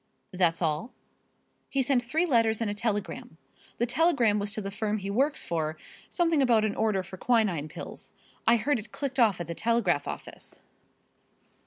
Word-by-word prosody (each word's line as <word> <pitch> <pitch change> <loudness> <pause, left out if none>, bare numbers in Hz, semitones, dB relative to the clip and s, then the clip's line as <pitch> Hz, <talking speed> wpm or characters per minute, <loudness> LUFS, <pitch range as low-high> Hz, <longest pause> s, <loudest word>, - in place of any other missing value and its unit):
"That's 175 -2 +2
all?" 160 +9 -1 0.8
"He 275 -1 +1
sent 260 -1 +3
three 310 +8 +1
letters 230 -7 +2
and 225 -3 -1
a - - -2
telegram. 205 -7 -3 0.4
The 240 - +1
telegram 245 -5 +3
was 205 0 -2
to 215 - -3
the 195 -1 -4
firm 210 +1 -1
he 200 -1 -4
works 275 +8 +1
for, 160 -2 -2 0.3
something 335 -4 +2
about 230 -4 +4
an 210 - 0
order 210 -4 0
for 190 +1 -10
quinine 205 -10 +1
pills - - -8 0.4
I 230 - +7
heard 250 +3 +1
it 215 0 -10
clicked 275 -2 -3
off 215 -7 +4
at 175 - -3
the 170 - -5
telegraph 200 -8 +1
office." - - -7
220 Hz, 175 wpm, -28 LUFS, 190-245 Hz, 0.8 s, I